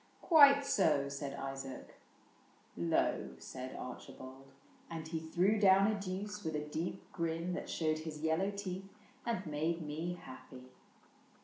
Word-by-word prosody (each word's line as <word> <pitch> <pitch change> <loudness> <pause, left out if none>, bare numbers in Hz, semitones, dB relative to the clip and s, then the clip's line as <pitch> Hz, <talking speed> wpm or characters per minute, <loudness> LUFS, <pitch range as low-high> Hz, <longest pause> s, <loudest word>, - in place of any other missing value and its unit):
*' - - -32
Quite 285 -4 +8
so," 150 - +3
said 140 0 -4
Isaac. 135 -1 -6 0.3
— - - -31
" - - -32
Low," 85 -1 +1
said 130 0 -7
Archi 125 - -7
bald; 130 +1 -11 0.4
And 165 -1 -5
he 160 0 -2
threw 180 +7 +2
down 195 -1 +7
a - - 0
deuce 200 +2 -4
with 160 -2 -2
a - - +1
deep 165 +5 -3
grin 170 +1 -1
That 180 - -4
showed 155 -1 0
his 155 -1 -6
yellow 160 +5 +2
teeth 195 -1 -5 0.4
and 225 -5 -1
made 160 +2 -1
me 160 +4 -3
happy. 130 0 -11
160 Hz, 155 wpm, -35 LUFS, 140-190 Hz, 0.4 s, Quite